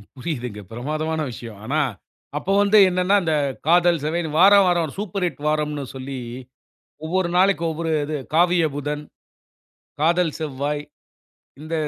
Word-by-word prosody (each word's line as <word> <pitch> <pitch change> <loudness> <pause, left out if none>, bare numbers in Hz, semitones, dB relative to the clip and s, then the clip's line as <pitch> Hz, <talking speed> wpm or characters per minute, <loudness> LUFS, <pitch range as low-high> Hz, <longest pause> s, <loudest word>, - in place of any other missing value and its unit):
புரியுதுங்க 125 -7 -5
பிரமாதமான 155 +7 -3
விஷயம். 115 -2 -9
ஆனா 145 +6 0 0.6
அப்போ 190 +6 -1
வந்து 205 +1 +4
என்னன்னா 180 +2 +2
அந்த 160 -2 0 0.3
காதல் 175 0 +4
செவைன் 160 +2 -1
வாரம் 200 +2 +7
வாரம் 170 -4 +1
சூப்பர் 195 -2 -2
ஹிட் 170 -4 -4
வாரம்னு 150 -2 -1
சொல்லி 130 0 -6 0.9
ஒவ்வொரு 180 +2 0
நாளைக்கு 190 -1 +3
ஒவ்வொரு 165 +1 -3
இது. 150 +1 -3 0.2
காவிய 175 +1 +4
புதன், 145 +1 -3 1.0
காதல் 170 +1 +2
செவ்வாய், 145 -1 -3 0.8
இந்த 155 +2 -7
160 Hz, 125 wpm, -22 LUFS, 145-175 Hz, 1.0 s, வாரம்